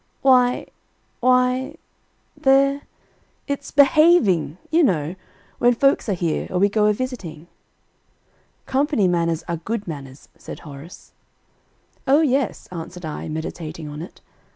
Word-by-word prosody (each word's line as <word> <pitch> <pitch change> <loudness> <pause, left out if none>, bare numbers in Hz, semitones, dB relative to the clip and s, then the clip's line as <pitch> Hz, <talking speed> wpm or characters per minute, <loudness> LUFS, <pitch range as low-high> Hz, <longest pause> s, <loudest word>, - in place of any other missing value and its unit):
"Why 250 -2 +4 0.5
why 255 +3 +2 0.6
they're 275 +1 +3 0.6
it's 280 0 -4
behaving, 280 - +4
you 330 +2 +4
know, 165 - +1 0.5
when 245 0 +4
folks 275 -2 +2
are 200 - +1
here, 170 -3 -2
or 180 - -2
we 200 +3 +3
go 210 0 +2
a 210 - +3
visiting." 200 - -6 1.2
"Company 270 -6 +1
manners 170 -2 0
are 170 -1 -2
good 210 +5 -4
manners;" 140 -4 -8
said - - -10
Horace. 150 +2 -12 0.9
"O 280 +4 +5
yes," 270 -5 0
answered 175 0 -7
I, 155 - -5
meditating 160 0 -6
on 150 +1 -7
it. 175 - -11
205 Hz, 125 wpm, -22 LUFS, 165-270 Hz, 1.2 s, O